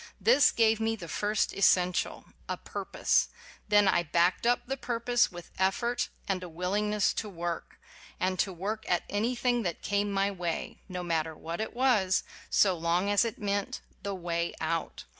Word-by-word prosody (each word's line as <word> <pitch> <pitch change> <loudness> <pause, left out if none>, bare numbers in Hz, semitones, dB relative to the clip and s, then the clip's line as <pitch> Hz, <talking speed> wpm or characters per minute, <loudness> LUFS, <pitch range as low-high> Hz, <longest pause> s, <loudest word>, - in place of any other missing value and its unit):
This 285 +1 +6
gave 225 -1 +3
me 225 0 0
the 175 -6 -9
first 205 +5 0
essential: 180 -2 +2 0.2
a - - -1
pur - - -6
pose. - - +2 0.4
Then 205 -1 +5
I 180 - +4
backed 175 +6 +1
up 245 0 +2
the 265 +2 -2
purpose 240 -1 +1
with 175 -1 -10
effort 235 +6 +1 0.2
and 190 -2 -1
a 180 - -7
willingness 205 +5 0
to 215 - -3
work, 170 -2 -5 0.4
and 185 0 0
to 195 - +1
work 205 +5 -4
at 175 - +2
anything 240 +3 +1
that 175 -6 -3
came 205 0 0
my 195 0 +1
way, 175 -3 -4
no 180 -1 -4
matter 160 -2 -1
what 165 +5 -5
it 220 - -4
was, 230 -7 +3 0.3
so 190 -3 +4
long 170 +4 +1
as 205 - +4
it 230 +1 -3
meant 200 -3 -2 0.2
"the 200 -1 -3
way 170 -1 -2
out." 165 0 -2
195 Hz, 175 wpm, -29 LUFS, 175-220 Hz, 0.4 s, This